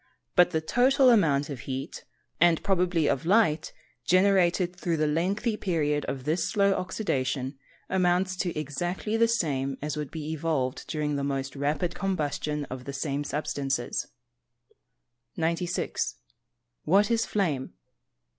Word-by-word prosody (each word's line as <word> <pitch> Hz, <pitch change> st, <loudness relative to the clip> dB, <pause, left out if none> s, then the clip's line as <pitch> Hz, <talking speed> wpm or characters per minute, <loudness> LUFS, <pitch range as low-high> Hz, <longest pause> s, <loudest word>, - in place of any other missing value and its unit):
But 180 Hz, -1 st, +6 dB
the 160 Hz, -, -1 dB
total 255 Hz, -, +4 dB
amount 150 Hz, -10 st, +3 dB
of 135 Hz, -, -5 dB
heat, 135 Hz, +2 st, -5 dB, 0.3 s
and 170 Hz, -1 st, +4 dB
probably 180 Hz, -5 st, +2 dB
of 130 Hz, -, 0 dB
light, 175 Hz, -3 st, +2 dB, 0.3 s
generated 185 Hz, -1 st, +3 dB
through 170 Hz, -2 st, -1 dB
the 155 Hz, -, +2 dB
lengthy 190 Hz, +9 st, 0 dB
period 150 Hz, -7 st, 0 dB
of 135 Hz, -2 st, -4 dB
this 155 Hz, +5 st, 0 dB
slow 200 Hz, -2 st, +3 dB
oxydation, 135 Hz, -, -2 dB, 0.3 s
amounts 185 Hz, 0 st, +1 dB
to 175 Hz, -4 st, -2 dB
exactly 175 Hz, +9 st, -3 dB
the 230 Hz, 0 st, +4 dB
same 140 Hz, -, -1 dB
as 150 Hz, +1 st, -4 dB
would 150 Hz, -2 st, -3 dB
be 155 Hz, -1 st, -5 dB
evolved 150 Hz, -5 st, -1 dB
during 150 Hz, -2 st, -1 dB
the 140 Hz, -, -2 dB
most 135 Hz, -1 st, -2 dB
rapid 145 Hz, +5 st, -1 dB
combustion 150 Hz, -5 st, -2 dB
of 130 Hz, -1 st, -8 dB
the 140 Hz, -, -5 dB
same 140 Hz, +1 st, -2 dB
substances. 140 Hz, -4 st, -2 dB, 1.3 s
96. 170 Hz, +2 st, -1 dB, 0.7 s
_What 200 Hz, +7 st, +4 dB
is 230 Hz, -1 st, +2 dB
flame? 155 Hz, -11 st, -1 dB
160 Hz, 135 wpm, -27 LUFS, 145-185 Hz, 1.3 s, But